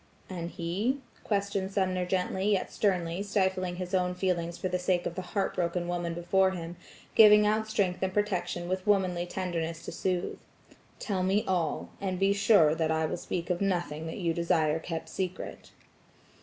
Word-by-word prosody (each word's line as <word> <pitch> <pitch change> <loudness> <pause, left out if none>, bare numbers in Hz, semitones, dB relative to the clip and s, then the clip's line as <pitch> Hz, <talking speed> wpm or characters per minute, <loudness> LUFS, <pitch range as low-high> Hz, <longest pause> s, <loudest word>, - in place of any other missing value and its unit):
"And 170 -2 -4
he?" 190 +11 -1 0.3
questioned 200 -2 -1
Sumner 185 -2 0
gently, 190 +2 +1
yet 190 - -1
sternly, 180 -3 0
stifling 190 -3 0
his 180 +1 -5
own 180 -1 +1
feelings 175 -2 -1
for - - -2
the 180 0 -1
sake 180 -1 +1
of - - -2
the 185 - -4
heart 195 +2 -2
broken 175 0 -1
woman 175 -1 -2
before 190 +2 +3
him, 175 -2 -5 0.4
giving 210 -1 +8
out 215 +1 +1
strength 195 -4 0
and 190 - 0
protection 185 -3 -1
with 185 +2 -2
womanly 185 -4 +2
tenderness 170 -3 -3
to - - -5
soothe. 180 -2 -2 0.6
"Tell 195 -4 -2
me 195 +3 +2
all, 175 -5 -1
and 190 -2 -1
be 195 +2 +3
sure 200 -6 +5
that 160 -1 0
I 160 0 +1
will - - -2
speak 175 0 -3
of 175 - -1
nothing 175 -5 -1
that 160 - -5
you 170 -4 0
desire 160 -2 +1
kept 160 0 -5
secret." 185 +2 -5
180 Hz, 175 wpm, -29 LUFS, 170-195 Hz, 0.6 s, giving